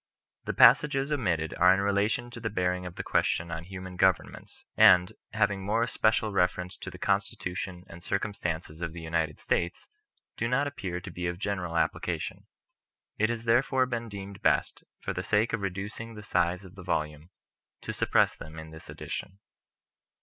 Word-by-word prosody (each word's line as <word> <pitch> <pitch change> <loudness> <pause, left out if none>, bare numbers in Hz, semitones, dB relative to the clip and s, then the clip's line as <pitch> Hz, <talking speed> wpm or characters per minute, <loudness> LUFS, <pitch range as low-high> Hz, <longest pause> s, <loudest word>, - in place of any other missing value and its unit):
The - - -2
passages 135 +3 +6
omitted 90 - 0
are 90 +1 +7
in - - -1
relation 100 +4 +1
to 120 - -8
the 115 -1 -2
bearing 90 -2 -1
of 90 - -9
the - - -4
question 85 +1 +1
on 85 0 -5
Human 95 0 -8
Governments; 95 0 0
and, 90 0 +7 0.2
having 100 -1 +1
more 110 +4 +1
especial 110 -2 +1
reference 90 -1 0
to - - -7
the - - -10
Constitution 100 -3 -2
and 85 -2 -12
circum 100 +4 -2
stances 80 -3 -4
of 85 -2 -3
the 85 - -7
United 80 -2 -1
States, 85 0 -1 0.5
do 115 - 0
not 125 +4 +2
appear 95 -11 -4
to 95 - -8
be 85 +1 -3
of 85 0 -3
general 90 -4 -2
application; - - -2 0.7
it 110 +1 +3
has 115 -1 -3
therefore 130 +3 +3
been 120 -2 -4
deemed 100 -1 -8
best, - - +1 0.2
for - - -3
the 90 - -2
sake 105 +5 +1
of 115 - -1
reducing 100 +4 -5
the 105 - -9
size 90 -1 0
of 90 - -13
the 100 - -11
Volume, 75 -2 -2 0.5
to - - -4
sup - - -2
press - - +4
them 80 +1 -10
in 80 0 -8
this 80 0 -12
edition. 95 - -6
95 Hz, 180 wpm, -29 LUFS, 90-110 Hz, 0.7 s, are